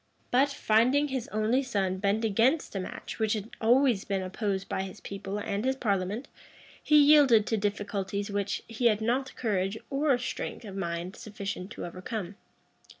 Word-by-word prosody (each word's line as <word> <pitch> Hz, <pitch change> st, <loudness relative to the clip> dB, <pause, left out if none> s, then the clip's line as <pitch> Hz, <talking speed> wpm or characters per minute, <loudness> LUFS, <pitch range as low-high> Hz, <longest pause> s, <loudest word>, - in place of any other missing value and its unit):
But, 270 Hz, +3 st, +4 dB
finding 265 Hz, +3 st, +3 dB
his 260 Hz, -3 st, -3 dB
only 215 Hz, +5 st, +1 dB
son 195 Hz, -7 st, -1 dB
bent 205 Hz, +3 st, +1 dB
against 230 Hz, +7 st, +2 dB
a -, -, 0 dB
match 185 Hz, -, -7 dB
which 220 Hz, -1 st, +2 dB
had 215 Hz, +1 st, -4 dB
always 240 Hz, -2 st, +4 dB
been 195 Hz, -1 st, -2 dB
opposed 195 Hz, +1 st, -2 dB
by -, -, -2 dB
his 190 Hz, +1 st, -7 dB
people 200 Hz, 0 st, -5 dB
and 205 Hz, 0 st, -2 dB
his 265 Hz, +1 st, +1 dB
parliament, 205 Hz, +1 st, -1 dB, 0.5 s
he 300 Hz, -, +4 dB
yielded 285 Hz, -7 st, +7 dB
to 225 Hz, -, 0 dB
difficulties 200 Hz, 0 st, -2 dB
which 200 Hz, -1 st, -2 dB
he 230 Hz, +1 st, +1 dB
had 215 Hz, -2 st, +3 dB
not 250 Hz, +4 st, -1 dB
courage 200 Hz, -3 st, -1 dB
or 275 Hz, -1 st, +2 dB
strength 250 Hz, -1 st, -5 dB
of 195 Hz, -2 st, -8 dB
mind 175 Hz, 0 st, -3 dB
sufficient 200 Hz, -3 st, -6 dB
to -, -, -6 dB
overcome. 185 Hz, +2 st, -5 dB
215 Hz, 165 wpm, -29 LUFS, 195-245 Hz, 0.5 s, yielded